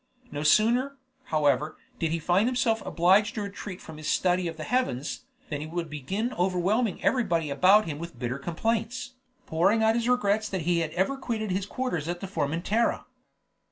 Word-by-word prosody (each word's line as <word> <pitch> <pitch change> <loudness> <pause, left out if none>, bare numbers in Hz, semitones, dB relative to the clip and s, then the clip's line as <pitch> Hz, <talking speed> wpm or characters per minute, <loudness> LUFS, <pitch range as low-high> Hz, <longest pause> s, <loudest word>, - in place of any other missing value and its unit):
No 145 - -4
sooner, 240 - +3 0.3
however, 150 -1 +1 0.2
did 165 - 0
he 165 - 0
find 180 +7 +2
himself 245 -3 +1
obliged 190 +5 +3
to 215 - -2
retreat 200 -2 -7
from 160 -1 -11
his 155 0 -7
study 180 -1 +2
of 165 -1 -6
the 155 - -5
heavens, 245 - -1 0.2
than 145 -2 -3
he 155 - -5
would 165 -1 -4
begin 195 - -3
overwhelming 190 +5 0
everybody 170 - +1
about 190 +9 +5
him 150 -2 -5
with 170 0 -8
bitter 125 +2 -3
complaints, 225 - -2 0.3
pouring 195 +8 +2
out 220 0 +4
his 235 +1 0
regrets 215 -3 +2
that 190 -2 -2
he 170 +1 +1
had 165 -2 -1
ever 190 +10 0
quitted 220 -6 -3
his 190 +1 -1
quarters 200 - -3
at 175 0 -3
Formentera. 185 +5 -1
185 Hz, 175 wpm, -27 LUFS, 160-225 Hz, 0.3 s, about